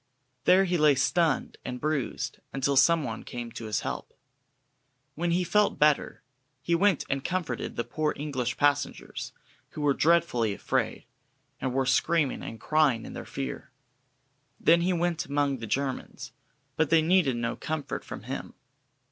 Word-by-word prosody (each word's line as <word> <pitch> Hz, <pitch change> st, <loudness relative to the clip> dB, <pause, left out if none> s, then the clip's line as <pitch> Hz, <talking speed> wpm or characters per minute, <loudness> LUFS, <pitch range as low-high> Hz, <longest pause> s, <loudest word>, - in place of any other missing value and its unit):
There 190 Hz, +1 st, +6 dB
he 175 Hz, -2 st, 0 dB
lay 150 Hz, -2 st, +5 dB
stunned 150 Hz, +3 st, +1 dB
and 125 Hz, 0 st, -5 dB
bruised, 150 Hz, -3 st, -2 dB
until 135 Hz, +1 st, 0 dB
some 160 Hz, +4 st, +5 dB
one 115 Hz, -4 st, -5 dB
came 120 Hz, -1 st, -6 dB
to 115 Hz, -, -7 dB
his 110 Hz, -1 st, -1 dB
help. -, -, -6 dB, 1.0 s
When 175 Hz, +2 st, -1 dB
he 175 Hz, +2 st, +2 dB
felt 205 Hz, +4 st, +2 dB
better, 150 Hz, -1 st, +2 dB, 0.4 s
he 170 Hz, +6 st, -1 dB
went 190 Hz, 0 st, +3 dB
and 135 Hz, 0 st, -2 dB
comforted 170 Hz, -9 st, -3 dB
the 120 Hz, -, -1 dB
poor 155 Hz, +3 st, -1 dB
English 130 Hz, -4 st, -2 dB
passengers, 145 Hz, -1 st, 0 dB, 0.4 s
who 150 Hz, -, -7 dB
were 145 Hz, -1 st, +3 dB
dreadfully 150 Hz, -10 st, +2 dB
afraid, -, -, -2 dB, 0.5 s
and 130 Hz, -, -2 dB
were 135 Hz, +1 st, +1 dB
screaming 145 Hz, +2 st, +2 dB
and 115 Hz, -, -7 dB
crying 150 Hz, -7 st, +2 dB
in -, -, -8 dB
their -, -, -7 dB
fear. 135 Hz, -, -5 dB, 0.9 s
Then 170 Hz, +1 st, +5 dB
he 180 Hz, +2 st, +1 dB
went 175 Hz, -1 st, 0 dB
among 140 Hz, -1 st, 0 dB
the 115 Hz, -, -6 dB
Germans, 135 Hz, +4 st, -3 dB, 0.4 s
but 160 Hz, -1 st, +1 dB
they 160 Hz, -1 st, +5 dB
needed 165 Hz, -6 st, +3 dB
no 120 Hz, 0 st, -2 dB
comfort 155 Hz, -3 st, -4 dB
from -, -, -8 dB
him. -, -, -6 dB
145 Hz, 155 wpm, -28 LUFS, 130-170 Hz, 1.0 s, There